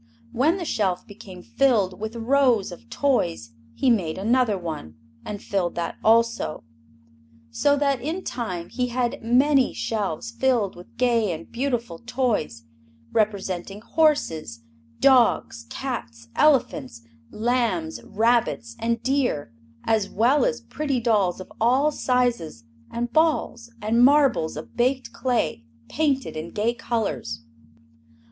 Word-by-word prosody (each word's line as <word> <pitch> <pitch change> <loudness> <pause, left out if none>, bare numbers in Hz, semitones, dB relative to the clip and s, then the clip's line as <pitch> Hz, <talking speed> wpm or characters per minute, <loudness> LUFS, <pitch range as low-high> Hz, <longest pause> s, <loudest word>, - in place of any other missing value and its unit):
When 310 +9 +2
the 355 - -4
shelf 190 - -1
became 190 -3 -12
filled 215 -9 +1
with 220 +2 -5
rows 240 -4 +2
of 115 -10 -12
toys 170 - 0 0.2
he 260 - +3
made 175 -9 0
another 225 +1 +2
one, 155 - -6 0.3
and 205 -1 -5
filled 190 -4 -2
that 170 - -3
also. 230 -5 +2 0.9
So 285 - +2
that 280 -3 +1
in 325 +8 -3
time 180 -8 -4
he 250 0 -1
had 250 +2 -2
many 260 +3 +3
shelves 195 - -3
filled 230 - +1
with 175 +5 -15
gay 235 -5 +2
and 160 - -7
beautiful 235 -8 -2
toys 235 - -1 0.5
representing 200 -2 -1
horses, 165 - 0 0.4
dogs, 240 - +3
cats, 115 - -6
elephants, 135 - +2 0.3
lambs, 245 +8 -1
rabbits 220 - 0
and 230 0 -1
deer, 245 - 0 0.3
as 220 -3 +1
well 245 - +3
as - - -1
pretty 280 -4 -2
dolls 210 -7 +1
of 185 - -10
all 260 +6 +3
sizes 245 - 0 0.3
and 235 +1 -4
balls 300 -7 +1
and 230 +3 +3
marbles 270 - +4
of - - -9
baked 255 +2 0
clay 245 - -1 0.3
painted 280 - 0
in 155 +2 -5
gay 220 +3 0
colors. 225 - -3
230 Hz, 125 wpm, -24 LUFS, 185-260 Hz, 0.9 s, marbles